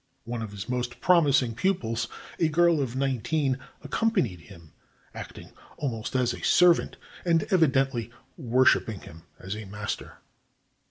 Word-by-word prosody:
One 120 Hz, 0 st, -5 dB
of 110 Hz, -, -5 dB
his 100 Hz, -2 st, -7 dB
most 125 Hz, -1 st, -3 dB
promising 140 Hz, -9 st, +4 dB
pupils, 115 Hz, -, -1 dB, 0.3 s
a 165 Hz, -, +3 dB
girl 170 Hz, 0 st, +3 dB
of 130 Hz, -2 st, -3 dB
nineteen, 135 Hz, +1 st, 0 dB, 0.2 s
accompanied 135 Hz, -, 0 dB
him, 80 Hz, 0 st, -15 dB, 0.4 s
acting -, -, -9 dB, 0.3 s
almost 120 Hz, -4 st, -4 dB
as 125 Hz, -2 st, +2 dB
a -, -, -9 dB
servant 175 Hz, -1 st, +4 dB, 0.3 s
and 165 Hz, -3 st, +2 dB
evidently 135 Hz, -, +2 dB, 0.3 s
worship 130 Hz, -5 st, +3 dB
ing 105 Hz, -4 st, -6 dB
him 80 Hz, 0 st, -12 dB, 0.2 s
as 95 Hz, +2 st, -5 dB
her 105 Hz, -1 st, -7 dB
master. 105 Hz, +1 st, -5 dB
130 Hz, 140 wpm, -27 LUFS, 110-155 Hz, 0.4 s, promising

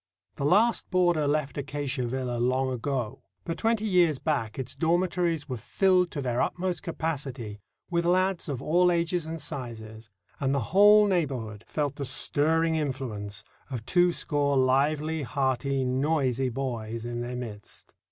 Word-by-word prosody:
The 140 Hz, -, -3 dB
last 210 Hz, +9 st, +3 dB
boarder 175 Hz, -5 st, +2 dB
left 145 Hz, -1 st, -1 dB
Acacia 140 Hz, -2 st, -3 dB
Villa 125 Hz, -1 st, -2 dB
long 130 Hz, +2 st, +1 dB
ago, 125 Hz, -1 st, -3 dB, 0.2 s
but 165 Hz, -, -4 dB
twenty 225 Hz, -1 st, +1 dB
years 175 Hz, -7 st, +3 dB
back 130 Hz, -8 st, -2 dB
its 130 Hz, -1 st, -5 dB
dormitories 170 Hz, 0 st, +1 dB
were 130 Hz, -3 st, -4 dB
filled 180 Hz, -, +2 dB
to 145 Hz, -4 st, -4 dB
their 125 Hz, -1 st, 0 dB
utmost 180 Hz, -2 st, -1 dB
capacity 140 Hz, -, -4 dB, 0.3 s
with 170 Hz, 0 st, +1 dB
lads 185 Hz, 0 st, +1 dB
of 135 Hz, -2 st, -3 dB
all 180 Hz, +3 st, +4 dB
ages 170 Hz, -1 st, 0 dB
and 165 Hz, 0 st, -5 dB
sizes, 115 Hz, -5 st, -7 dB, 0.3 s
and 135 Hz, 0 st, +1 dB
the 120 Hz, -7 st, -2 dB
whole 210 Hz, +2 st, +7 dB
neighbourhood 130 Hz, -, -1 dB
felt 145 Hz, -2 st, -2 dB
the 140 Hz, -, -3 dB
stirring 160 Hz, +4 st, +1 dB
influence 125 Hz, -9 st, -3 dB, 0.3 s
of 120 Hz, -5 st, -5 dB
twoscore 145 Hz, -4 st, +2 dB
lively, 145 Hz, +4 st, +2 dB
hearty, 135 Hz, +1 st, 0 dB
noisy 130 Hz, -1 st, +1 dB
boys 115 Hz, -3 st, -4 dB
in 120 Hz, 0 st, -3 dB
its 125 Hz, +1 st, -4 dB
midst. 105 Hz, -4 st, -9 dB
140 Hz, 145 wpm, -27 LUFS, 125-165 Hz, 0.3 s, whole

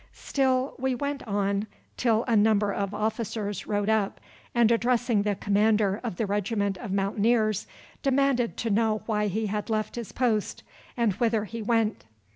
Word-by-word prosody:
Still 265 Hz, -1 st, 0 dB
we 260 Hz, 0 st, 0 dB
went 285 Hz, +2 st, -3 dB
on 200 Hz, 0 st, 0 dB, 0.3 s
till 230 Hz, -2 st, +2 dB
a 235 Hz, -3 st, +1 dB
number 210 Hz, -1 st, +3 dB
of 200 Hz, -1 st, -2 dB
officers 215 Hz, -1 st, -3 dB
rode 205 Hz, -1 st, 0 dB
up, 215 Hz, -2 st, +1 dB, 0.4 s
and 235 Hz, -1 st, +4 dB
addressing 235 Hz, -1 st, +2 dB
the 205 Hz, 0 st, 0 dB
commander 205 Hz, 0 st, +2 dB
of 230 Hz, -7 st, -3 dB
the 220 Hz, -, -1 dB
regiment 200 Hz, 0 st, -1 dB
of 210 Hz, -, -6 dB
Mountaineers, 215 Hz, +2 st, +1 dB, 0.3 s
demanded 270 Hz, -3 st, +1 dB
to 230 Hz, -, -1 dB
know 215 Hz, 0 st, +1 dB
why 210 Hz, -2 st, 0 dB
he 215 Hz, +3 st, -1 dB
had 210 Hz, +1 st, -3 dB
left 215 Hz, -1 st, -1 dB
his 235 Hz, -3 st, -5 dB
post, 230 Hz, -5 st, -1 dB, 0.3 s
and 230 Hz, -4 st, +2 dB
whither 225 Hz, -3 st, +1 dB
he 230 Hz, +2 st, -6 dB
went. 220 Hz, -, 0 dB
220 Hz, 160 wpm, -27 LUFS, 205-235 Hz, 0.4 s, and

